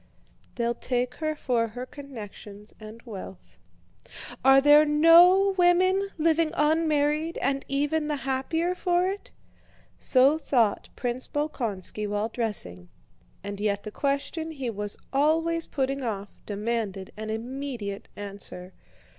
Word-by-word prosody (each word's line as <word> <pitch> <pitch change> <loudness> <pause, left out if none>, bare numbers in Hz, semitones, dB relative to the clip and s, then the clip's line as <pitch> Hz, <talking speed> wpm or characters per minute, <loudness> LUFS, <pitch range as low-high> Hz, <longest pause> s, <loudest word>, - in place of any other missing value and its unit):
They'll 235 -1 0
take 245 +1 -2
her 310 -1 -2
for 240 -5 0
her 245 +3 -7
connections 215 -7 -10
and 220 +2 -11
wealth. 195 -5 -10 0.8
Are 270 0 +7
there 290 +2 +7
no 340 +6 +6
women 370 +3 +3
living 325 0 +2
unmarried, 305 +1 +1
and 275 0 0
even 295 +3 0
the 300 - -1
happier 280 +6 -1
for 360 0 +1
it?" 395 +2 -5 0.7
So 275 +4 +4
thought 235 -9 +1
Prince 245 +1 -3
Bolkónski 225 - -2
while 205 +2 -1
dressing, 90 - -3 0.5
and 200 0 -6
yet 205 -1 0
the 215 - -7
question 280 +6 -2
he 270 -7 -4
was 205 -1 -4 0.2
always 325 +4 +1
putting 275 0 -2
off 205 -5 -4
demanded 205 -2 -3
an 215 0 -6
immediate 230 -3 -5
answer. 200 -2 -4
265 Hz, 120 wpm, -26 LUFS, 215-310 Hz, 0.8 s, Are